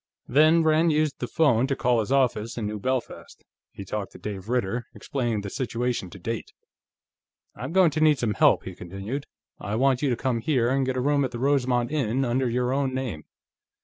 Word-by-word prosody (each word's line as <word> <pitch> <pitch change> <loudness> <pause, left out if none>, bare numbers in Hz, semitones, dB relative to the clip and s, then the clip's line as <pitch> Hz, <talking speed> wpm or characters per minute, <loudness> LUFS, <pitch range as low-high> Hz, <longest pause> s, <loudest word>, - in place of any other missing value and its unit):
Then 155 +5 +5
Rand 160 +1 +3
used 155 -1 0
the 125 - -3
phone 130 -6 +2
to 135 - 0
call 125 -2 +2
his 110 +3 -2
office 125 -5 +1
in 115 - -2
New 105 0 -4
Belfast. 130 +3 -4 0.3
He 100 - -9
talked 100 +1 -4
to - - -11
Dave 100 -1 -7
Ritter, 120 -1 -1
explaining 120 -6 -2
the 100 - -6
situation 120 -6 -2
to 90 - -11
date. 115 +4 -5 1.0
"I'm 130 +7 -6
going 180 -2 +4
to 155 +2 -2
need 155 -2 +5
some 115 -4 -1
help," - - +4
he 95 - -7
continued. 95 +11 -6 0.3
"I 100 +3 -3
want 130 +1 +2
you 145 - +1
to 120 - +1
come 125 -2 -1
here 120 -1 +1
and 135 0 +1
get 130 0 -1
a - - 0
room 140 +1 +2
at 130 - -1
the 120 - -7
Rosemont 125 -2 +1
Inn, 135 -3 0
under 125 +1 0
your 125 +2 0
own 135 -1 0
name. 120 - -4
125 Hz, 210 wpm, -25 LUFS, 115-140 Hz, 1.0 s, Then